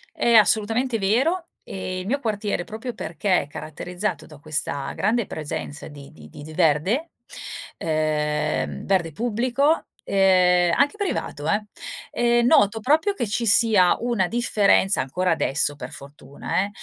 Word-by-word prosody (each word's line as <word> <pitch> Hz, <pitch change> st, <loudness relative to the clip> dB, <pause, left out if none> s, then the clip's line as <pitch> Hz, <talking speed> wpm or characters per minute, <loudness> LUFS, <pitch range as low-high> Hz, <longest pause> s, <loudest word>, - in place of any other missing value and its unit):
È 235 Hz, -, +2 dB
assolutamente 225 Hz, +3 st, +3 dB
vero 265 Hz, -, +1 dB, 0.2 s
e 185 Hz, -1 st, -5 dB
il 185 Hz, -, -6 dB
mio 275 Hz, +6 st, 0 dB
quartiere, 210 Hz, -6 st, -2 dB
proprio 225 Hz, +6 st, -7 dB
perché 180 Hz, 0 st, 0 dB
è -, -, -13 dB
caratterizzato 180 Hz, +7 st, -5 dB
da 150 Hz, -3 st, -14 dB
questa 145 Hz, -2 st, -2 dB
grande 225 Hz, +1 st, 0 dB
presenza 145 Hz, -1 st, -6 dB
di 145 Hz, -2 st, -12 dB
di 75 Hz, -1 st, -14 dB
di 145 Hz, -, -11 dB
d 155 Hz, +1 st, -10 dB
verde, 185 Hz, -, +1 dB, 0.7 s
ehm, 155 Hz, -1 st, -1 dB
verde 180 Hz, -4 st, +1 dB
pubblico, 245 Hz, -, 0 dB, 0.2 s
ehm, 180 Hz, -2 st, +3 dB
anche 285 Hz, +7 st, +2 dB
privato 365 Hz, -, -3 dB, 0.7 s
eh, 240 Hz, 0 st, +2 dB
noto 225 Hz, -4 st, +4 dB
proprio 310 Hz, -, +2 dB
che 240 Hz, -, -3 dB
ci 230 Hz, +3 st, -1 dB
sia 210 Hz, -4 st, +4 dB
una 235 Hz, -6 st, 0 dB
differenza 210 Hz, -3 st, +2 dB
ancora 180 Hz, +8 st, -1 dB
adesso 145 Hz, -2 st, 0 dB
per 130 Hz, -3 st, -8 dB
fortuna, 140 Hz, +5 st, -5 dB
ehm, 200 Hz, -, -4 dB
195 Hz, 140 wpm, -23 LUFS, 155-235 Hz, 0.7 s, noto